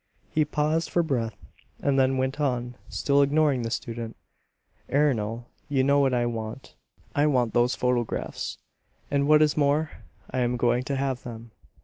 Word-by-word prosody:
He 155 -1 +2
paused 155 +2 0
for 175 - +2
breath, 115 - -2 0.4
and 140 -1 +1
then 130 0 +3
went 130 +2 -1
on, 125 -3 -1 0.2
still 140 0 +2
ignoring 140 -2 +3
the 115 - -2
student, 115 0 -4 0.8
"Ernol, 120 -5 +1 0.2
you 135 -2 +2
know 140 +1 +4
what 135 -2 +3
I 120 -1 +1
want. 115 +1 -5 0.4
I 145 +1 +3
want 125 -5 +1
those 120 +1 +3
photographs; 125 -2 -2 0.5
and 140 0 +2
what 155 0 +6
is 150 - +2
more, 150 +1 +2 0.4
I 130 - -1
am 125 0 +1
going 120 0 +2
to 140 - -2
have 135 -2 -1
them. 115 -1 -9
130 Hz, 160 wpm, -26 LUFS, 120-145 Hz, 0.8 s, what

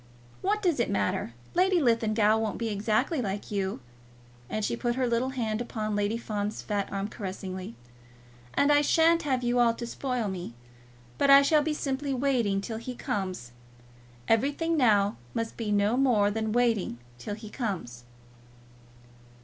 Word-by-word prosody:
What 420 +2 0
does 345 -8 +2
it 235 - +1
matter? 100 +3 -1 0.2
Lady 365 +1 +3
Linlithgow 220 -5 +3
won't 220 -2 -2
be 230 -1 -2
exactly 215 - 0
like 205 -1 -4
you," 195 -7 -2 0.7
and 215 -1 -1
she - - -1
put 240 0 -1
her 260 0 +1
little 240 +2 +1
hand 230 -4 -2
upon 215 -3 -3
Lady 205 +2 0
Fawn's 210 -2 -3
fat 205 -2 -2
arm 195 0 -2
caressingly, 190 - -6 0.8
"and 285 +1 +4
I 290 0 +5
sha'n't 330 +2 +4
have 260 -4 -1
you 240 0 +1
all 235 -1 +4
to 235 - -5
spoil 250 -2 -2
me; 175 -11 -5 0.6
but 280 - +3
I 275 0 +9
shall 305 +1 +4
be 300 0 -1
simply 275 -1 -2
waiting 245 -7 +1
till 220 +2 -5
he 250 +2 -6
comes. 185 - -4 0.8
Everything 290 +8 +1
now 210 -8 +3 0.2
must 230 0 -2
be 220 -3 -3
no 205 +2 +2
more 225 -7 +3
than 220 0 -2
waiting 230 - +1 0.2
till 205 +11 -5
he 215 0 -10
comes." 170 - -4
225 Hz, 160 wpm, -28 LUFS, 205-265 Hz, 0.8 s, I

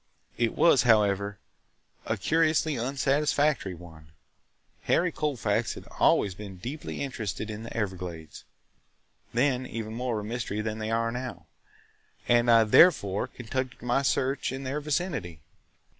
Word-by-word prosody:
It 115 -1 +1
was, 145 -7 +5
however, 105 -3 +2 0.7
a - - 0
curiously 160 -1 +2
unsatisfactory 140 -2 +1
one. 80 -3 -14 0.7
Harry 175 +1 +2
Colfax 145 - -1
had - - -10
always 100 - +3
been 95 0 -9
deeply 140 - -5
interested 110 -5 -4
in 105 +1 -6
the 115 - -7
Everglades 90 -7 -5 0.9
(then 130 +1 +1
even 110 -1 -5
more 120 -1 -2
of 105 - -6
a - - -7
mystery 115 -3 -3
than 110 0 -4
they 110 0 -3
are 115 0 0
now), 125 0 -6 0.8
and 120 0 +4
I 115 -1 +7
therefore 105 - +4
conducted 130 +1 -5
my 125 +2 +1
search 135 -1 0
in 135 +1 -5
their 135 +3 -3
vicinity. 145 - -2
120 Hz, 135 wpm, -27 LUFS, 105-135 Hz, 0.9 s, I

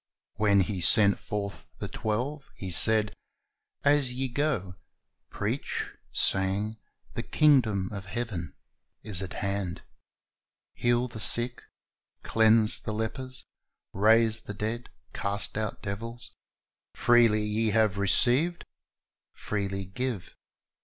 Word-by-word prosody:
When 100 -2 +4
He 95 0 -2
sent 100 +2 +4
forth 100 -1 -5
the - - -4
twelve, 130 +7 -3
He 95 -2 -5
said, 110 +3 +4 0.7
"As 145 -3 +3
ye 130 +1 -3
go, 120 -9 -1 0.6
preach, - - -3 0.2
saying, 100 +3 0 0.4
The - - -3
kingdom 120 -11 +3
of 100 -2 -6
heaven 90 - -4 0.5
is 100 -4 -1
at 95 -2 -6
hand. 100 -3 -3 0.9
Heal 120 +1 +1
the 115 -2 -8
sick, 120 +3 +2 0.6
cleanse 110 -1 +4
the 110 - -5
lepers, 130 +4 -4 0.5
raise 110 +2 +4
the 105 - -8
dead, 110 +4 -4 0.2
cast 100 +1 0
out 110 0 -3
devils: 115 +4 -6 0.6
freely 115 -3 +4
ye 110 +1 0
have 105 -2 +2
received, 130 - +2 0.7
freely 100 -2 -3
give."' 110 +1 -4
110 Hz, 110 wpm, -28 LUFS, 100-120 Hz, 0.9 s, When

